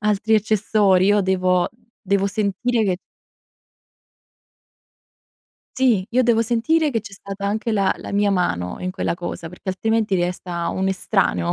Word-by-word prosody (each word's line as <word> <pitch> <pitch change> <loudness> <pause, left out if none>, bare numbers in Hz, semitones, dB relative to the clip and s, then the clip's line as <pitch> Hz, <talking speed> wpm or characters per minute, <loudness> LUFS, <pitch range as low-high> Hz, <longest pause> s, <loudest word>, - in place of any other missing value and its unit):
altri 210 +1 +1
accessori; 205 -3 +2
io 205 0 +4
devo 185 -1 +1 0.4
devo 200 0 +2
sentire 215 +3 0
che 185 -2 0 2.8
Sì, 240 -8 +2
io 255 +2 +3
devo 230 -2 +3
sentire 245 +8 +1
che 230 -4 -1
c'è 200 - -11
stata 200 0 -8
anche 220 +3 -1
la 200 -3 +2
la - - -8
mia 205 0 +2
mano 90 - -1
in 185 - -3
quella 185 -2 -2
cosa, 170 -1 -6
perché 180 +2 -11
altrimenti 220 +2 0
resta 175 -1 -2
un 190 0 -1
estraneo 190 -2 0
200 Hz, 140 wpm, -21 LUFS, 185-220 Hz, 2.8 s, io